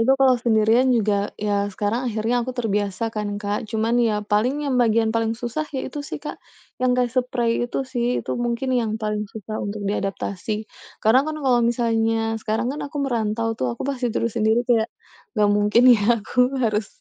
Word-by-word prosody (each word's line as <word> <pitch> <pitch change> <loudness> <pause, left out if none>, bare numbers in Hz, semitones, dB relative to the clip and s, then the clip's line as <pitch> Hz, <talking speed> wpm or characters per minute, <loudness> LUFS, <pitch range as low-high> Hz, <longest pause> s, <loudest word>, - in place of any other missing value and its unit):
Itu 265 +4 +4
kalau 265 -1 +5
sendirian 230 +2 +3
juga, 205 -2 +1
ya 205 -1 0
sekarang 210 +6 -2
akhirnya 225 +2 0
aku 255 +1 -5
terbiasa 210 -1 -1
kan, 210 -1 -3
Kak. 205 +1 -3
Cuma 220 +1 0
ya, 220 -3 +2
paling 250 +9 +1
yang 255 -3 +1
bagian 225 -1 +3
paling 225 0 0
susah, 245 +6 -4
ya - - -2
itu 295 - -4
sih, 285 - -6
Kak. - - -8 0.4
Yang 255 - +3
kayak 245 -1 +1
seprei 245 -2 -1 0.2
itu 270 - -2
sih, 245 -1 -1
itu - - -3
mungkin 240 +2 -1
yang 225 -4 0
paling 210 -1 -3
susah 215 0 -6
untuk 205 0 -4
diadaptasi. 200 +1 -3 0.4
Karena 225 +5 +6
kan 310 - -3
kalau 245 -2 +4
misalnya, 225 -1 +1
sekarang 225 +4 -1
kan 295 - -6
aku 285 +1 -6
merantau 225 -2 -1
tuh, 125 - -2
aku - - -5
pasti 265 -3 -1
tidur 230 0 -1
sendiri 225 +2 +2
kayak, 235 -2 +2 0.5
nggak 210 -1 +4
mungkin 210 +3 +3
ya 220 - +3 0.2
aku 250 +4 +1 0.2
harus, 215 -2 0
225 Hz, 185 wpm, -23 LUFS, 210-245 Hz, 0.5 s, Karena